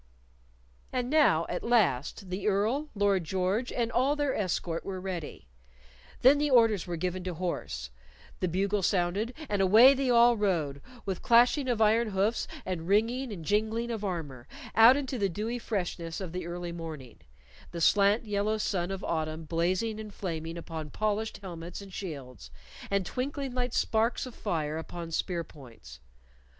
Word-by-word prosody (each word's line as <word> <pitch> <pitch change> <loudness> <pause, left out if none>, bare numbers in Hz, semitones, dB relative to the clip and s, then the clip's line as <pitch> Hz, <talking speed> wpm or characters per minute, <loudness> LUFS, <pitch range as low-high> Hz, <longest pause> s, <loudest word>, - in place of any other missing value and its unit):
And 250 0 -2
now, 280 - +4
at 180 - -3
last, 195 - +1
the 190 +3 -2
Earl, 220 +9 +1
Lord 200 -3 +2
George, 190 +8 -1
and 235 -2 -1
all 265 +4 +2
their 290 -2 0
escort 175 -4 -2
were 190 -1 -5
ready; 180 -5 -6 0.8
then 275 +3 +7
the 295 0 +1
orders 225 -8 +4
were 175 - -3
given 180 +2 -2
to 180 -2 -4
horse, 155 - -4 0.5
the 185 - 0
bugle 195 +4 0
sounded, 190 +5 0 0.2
and 205 -4 0
away 220 +8 +8
they 270 -1 -1
all 240 0 +6
rode, 160 -9 0 0.2
with 190 -3 -3
clashing 245 +4 +4
of 235 -3 +2
iron 225 +2 +3
hoofs 205 +3 0 0.2
and 175 -3 -4
ringing 230 +6 +1
and 170 -6 -7
jingling 220 +4 0
of 220 -2 -4
armor, 150 -10 -4 0.3
out 230 +4 +8
into 265 -3 -3
the 200 -1 +1
dewy 220 +7 -3
freshness 175 -7 -3
of 185 -4 -5
the 180 -1 -5
early 175 0 -5
morning, 160 -7 -8 0.5
the 170 - -6
slant 200 +6 +4
yellow 210 +1 0
sun 190 -4 -1
of 195 0 -5
autumn 160 0 -2
blazing 185 +7 0
and 215 -2 -8
flaming 165 -3 -4
upon 160 -2 -6
polished 215 +4 -1
helmets 175 -2 -7
and 200 -2 -11
shields, 135 - -7 0.4
and 200 -2 0
twinkling 270 +4 -3
like 250 -1 -1
sparks 230 +2 +1
of 255 - -9
fire 160 -8 -2
upon 170 0 -7
spear 170 +1 -1
points. 115 - -14
195 Hz, 160 wpm, -29 LUFS, 170-230 Hz, 0.8 s, away